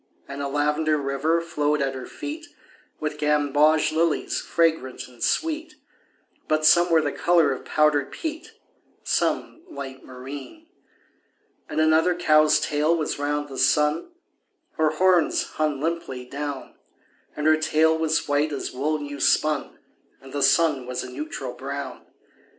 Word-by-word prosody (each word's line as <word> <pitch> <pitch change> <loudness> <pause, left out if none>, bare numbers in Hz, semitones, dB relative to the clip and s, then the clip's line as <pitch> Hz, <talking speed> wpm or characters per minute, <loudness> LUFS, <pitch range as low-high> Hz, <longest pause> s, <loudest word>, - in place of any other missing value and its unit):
And 140 0 -6
a 140 - -2
lavender 150 +2 +1
river 140 +4 0
flowed 150 -3 0
at 135 -1 -1
her 130 -1 -7
feet 320 +3 -7 0.5
With 150 -1 -4
gamboge 150 +1 +3
lilies 160 0 0
fragrant 160 -6 0
and 125 -2 -18
sweet, 320 -1 -1 0.7
But 155 0 +1
some 175 +2 +6
were 165 -2 +4
the 145 - -1
color 170 -3 +3
of 130 - -5
powdered 150 -2 +2
peat, 320 +7 -6 0.5
Some - - -1
light 135 - -8
marine. 135 - -10 1.0
And 150 - -2
another 160 +3 +3
cow's 155 -3 +4
tail 150 +3 +1
was 155 -2 -3
round 145 0 -1
the 135 -2 -7
sun 150 - +2 0.7
(Her 160 -1 +2
horns 175 +1 +2
hung 150 -3 -2
limply 150 -5 -3
down); 140 +1 -6 0.6
And 150 - -4
her 155 0 +5
tail 155 0 +2
was 160 0 0
white 145 +1 +1
as 140 - -4
wool 150 +4 -1
new 145 -1 -7
spun, 150 +1 +1 0.4
And 135 0 -14
the 145 - -2
sun 150 -5 +3
was 125 0 -3
a 130 - -8
neutral 135 -2 -6
brown. 135 0 -7
150 Hz, 145 wpm, -24 LUFS, 140-160 Hz, 1.0 s, some